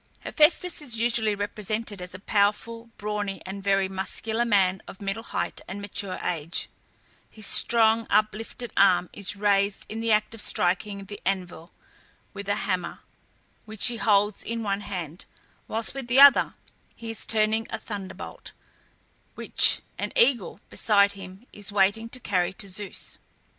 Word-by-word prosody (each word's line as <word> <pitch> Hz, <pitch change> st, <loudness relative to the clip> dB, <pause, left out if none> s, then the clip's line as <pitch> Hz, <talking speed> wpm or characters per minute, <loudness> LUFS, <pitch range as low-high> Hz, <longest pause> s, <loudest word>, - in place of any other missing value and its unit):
Hephæstus 340 Hz, +2 st, +3 dB
is 245 Hz, -6 st, -1 dB
usually 225 Hz, -2 st, +1 dB
represented 210 Hz, 0 st, -3 dB
as 180 Hz, +1 st, -7 dB
a -, -, -8 dB
powerful, 215 Hz, +3 st, 0 dB
brawny, 205 Hz, -1 st, -3 dB
and 195 Hz, +1 st, -7 dB
very 195 Hz, -1 st, +2 dB
muscular 220 Hz, +4 st, -1 dB
man 190 Hz, -4 st, +2 dB
of -, -, -11 dB
middle 200 Hz, +2 st, -3 dB
height -, -, -4 dB
and 190 Hz, +3 st, -6 dB
mature 200 Hz, -1 st, -4 dB
age; 165 Hz, -1 st, -2 dB, 0.6 s
his 215 Hz, -2 st, -6 dB
strong 225 Hz, +1 st, +4 dB
uplifted 215 Hz, +2 st, -1 dB
arm 185 Hz, -2 st, +4 dB
is 200 Hz, -1 st, 0 dB
raised 200 Hz, 0 st, +1 dB
in 220 Hz, -, -5 dB
the 230 Hz, 0 st, 0 dB
act 215 Hz, +1 st, +2 dB
of 225 Hz, -, -4 dB
striking 195 Hz, +3 st, 0 dB
the 205 Hz, +1 st, -10 dB
anvil 180 Hz, -3 st, -3 dB, 0.6 s
with 200 Hz, 0 st, -7 dB
a 205 Hz, -, +2 dB
hammer, 185 Hz, -2 st, -3 dB, 0.6 s
which 215 Hz, -1 st, -4 dB
he 235 Hz, -, -4 dB
holds 205 Hz, -2 st, +2 dB
in 230 Hz, 0 st, -4 dB
one 200 Hz, -1 st, -1 dB
hand, 180 Hz, -5 st, -6 dB, 0.4 s
whilst 225 Hz, 0 st, -2 dB
with 270 Hz, -3 st, -6 dB
the 250 Hz, +3 st, +3 dB
other 280 Hz, 0 st, +7 dB, 0.4 s
he 230 Hz, -1 st, -7 dB
is 225 Hz, -, -4 dB
turning 220 Hz, 0 st, +1 dB
a -, -, -3 dB
thunderbolt, 200 Hz, -5 st, -8 dB, 0.8 s
which -, -, +6 dB, 0.2 s
an -, -, -3 dB
eagle 235 Hz, -6 st, +2 dB
beside 200 Hz, -2 st, +3 dB
him 195 Hz, +2 st, -11 dB
is 205 Hz, 0 st, -6 dB
waiting 205 Hz, +3 st, +1 dB
to 255 Hz, -, -5 dB
carry 185 Hz, -5 st, -1 dB
to 200 Hz, -, -5 dB
Zeus. 195 Hz, +1 st, -6 dB
205 Hz, 155 wpm, -25 LUFS, 195-225 Hz, 0.8 s, other